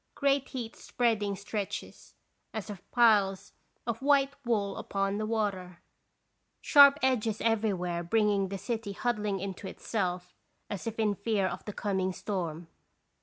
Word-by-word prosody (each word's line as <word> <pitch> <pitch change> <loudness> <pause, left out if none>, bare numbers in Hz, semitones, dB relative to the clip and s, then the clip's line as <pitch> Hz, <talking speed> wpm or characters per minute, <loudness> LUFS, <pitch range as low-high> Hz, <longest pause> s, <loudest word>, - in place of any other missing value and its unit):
Great 280 -1 +1
heat 240 -4 -5
spreading 215 -5 0
stretches, 200 0 -6 0.4
as 215 -1 -4
of 195 - -11
piles 205 -5 +3 0.3
of 235 0 -3
white 275 0 +3
wool 210 -5 0
upon 195 +1 -1
the 215 - -2
water. 195 -5 -2 0.8
Sharp 280 -1 +7
edges 230 -5 +1
everywhere 195 -6 0
bringing 205 +1 +2
the 195 - -3
city 225 -1 -4
huddling 210 -3 -1
into 195 0 -5
itself, 180 -4 -3 0.4
as 205 +3 -4
in 220 -2 0
fear 205 0 0
of 175 -1 -3
the 210 - -5
coming 190 -3 -1
storm. 175 -5 -4
205 Hz, 130 wpm, -30 LUFS, 195-230 Hz, 0.8 s, Sharp